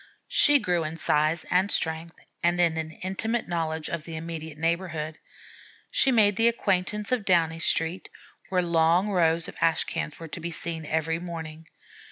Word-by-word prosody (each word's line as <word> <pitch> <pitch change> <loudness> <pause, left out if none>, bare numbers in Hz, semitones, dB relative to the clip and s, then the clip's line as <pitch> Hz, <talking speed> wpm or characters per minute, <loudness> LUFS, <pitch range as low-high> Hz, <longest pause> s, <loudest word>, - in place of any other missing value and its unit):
She 290 0 +6
grew 180 -9 0
in 155 +1 -5
size 155 +1 +1
and 185 +2 +3
strength 160 +1 0 0.3
and 175 +1 +2
in 170 -2 +3
an 160 -1 -3
intimate 205 +7 -3
knowledge 160 -2 -2
of 170 -2 -4
the 165 0 -8
immediate 160 -1 -6
neighborhood. 165 -1 -2 0.7
She - - +3
made 205 -4 +4
the 230 - +4
acquaintance 210 -2 0
of 250 -4 +1
Downey 165 -4 +2
Street, 165 +1 +1 0.4
where 185 -1 +1
long 170 +3 +3
rows 165 -3 +2
of - - -9
ash 165 -1 +3
cans 150 - -5
were 165 - -7
to 170 - -6
be 170 +1 -4
seen 165 -1 -4
every 160 +1 -1
morning. 165 -2 -7
170 Hz, 170 wpm, -26 LUFS, 160-185 Hz, 0.7 s, She